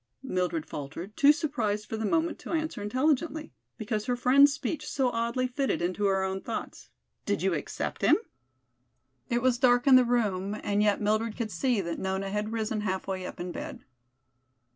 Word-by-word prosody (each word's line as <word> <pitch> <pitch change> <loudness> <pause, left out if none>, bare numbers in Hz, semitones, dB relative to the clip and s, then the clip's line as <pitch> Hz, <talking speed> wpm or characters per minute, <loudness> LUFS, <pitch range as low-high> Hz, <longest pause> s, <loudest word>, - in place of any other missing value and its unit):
Mildred 180 - -1
faltered, 160 +8 -7
too 285 +1 +7
surprised 235 -10 -1
for - - -4
the 220 -1 -2
moment 330 +6 0
to - - -6
answer 315 -8 -2
intelligently, 300 +7 0 0.2
because 215 -1 -3
her 250 - +1
friend's 270 +4 +6
speech 300 +1 -4
so 265 -2 +1
oddly 235 +2 -1
fitted 260 +2 -1
into 180 +4 -1
her 195 -1 +2
own 190 0 -2
thoughts. 230 - -6 0.4
"Did - - 0
you - - +2
accept - - -4
him?" - - +5 1.1
It 240 -1 0
was 250 -2 +2
dark 245 -1 +4
in 265 -2 +8
the 255 - +6
room, 210 -5 0
and 205 0 +1
yet 210 0 +2
Mildred 215 +1 0
could 225 -3 -3
see 245 -4 +1
that 170 -2 -4
Nona 190 +1 -2
had 210 +1 -2
risen 220 -1 -2
half 190 -2 -2
way 185 -1 -3
up - - -9
in 175 0 -4
bed. - - -7
220 Hz, 185 wpm, -28 LUFS, 195-255 Hz, 1.1 s, in